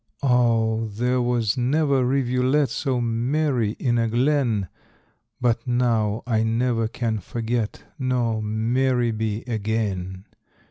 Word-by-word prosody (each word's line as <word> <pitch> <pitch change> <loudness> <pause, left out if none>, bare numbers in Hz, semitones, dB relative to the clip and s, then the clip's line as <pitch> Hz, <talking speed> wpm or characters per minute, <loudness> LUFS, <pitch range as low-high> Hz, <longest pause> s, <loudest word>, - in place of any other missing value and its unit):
Oh, 115 -3 +2
there 125 +4 0
was 120 -3 0
never 140 +1 +2
rivulet 130 +2 +1
So 135 -4 -1
merry 120 0 0
in 120 -2 0
a 115 - +1
glen; 120 -4 +1 0.7
But 120 0 0
now 115 -3 +1
I 110 -3 +1
never 115 0 +1
can 110 -1 -2
forget, 115 +2 -3 0.2
Nor 120 -4 0
merry 120 +3 +1
be 110 0 -2
again. 100 -5 -3
120 Hz, 110 wpm, -23 LUFS, 110-125 Hz, 0.7 s, Oh